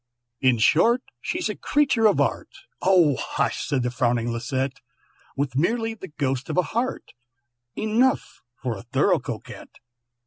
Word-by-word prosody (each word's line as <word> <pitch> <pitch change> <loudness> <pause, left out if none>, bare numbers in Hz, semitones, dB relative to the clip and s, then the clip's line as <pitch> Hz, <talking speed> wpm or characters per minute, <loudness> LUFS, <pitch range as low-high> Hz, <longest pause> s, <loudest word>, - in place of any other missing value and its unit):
"In 130 -1 +3
short, 230 - +4 0.2
she's - - -2
a - - -3
creature 275 -7 +2
of 205 - +2
art," - - 0 0.3
("Oh 175 -8 +4
hush!" - - -1
said 135 -5 0
the 125 - -1
frowning 120 -1 0
Lisette), 130 +3 -2 0.6
"With 135 -2 -1
merely 225 - +1
the 205 -4 -9
ghost 135 -5 -2
of - - -2
a 180 - +4
heart, 245 +3 -2 0.6
Enough 230 +5 +1
for 125 -3 -4
a 95 - -8
thorough 120 - +2
Coquette. - - -8
145 Hz, 145 wpm, -24 LUFS, -, 0.6 s, short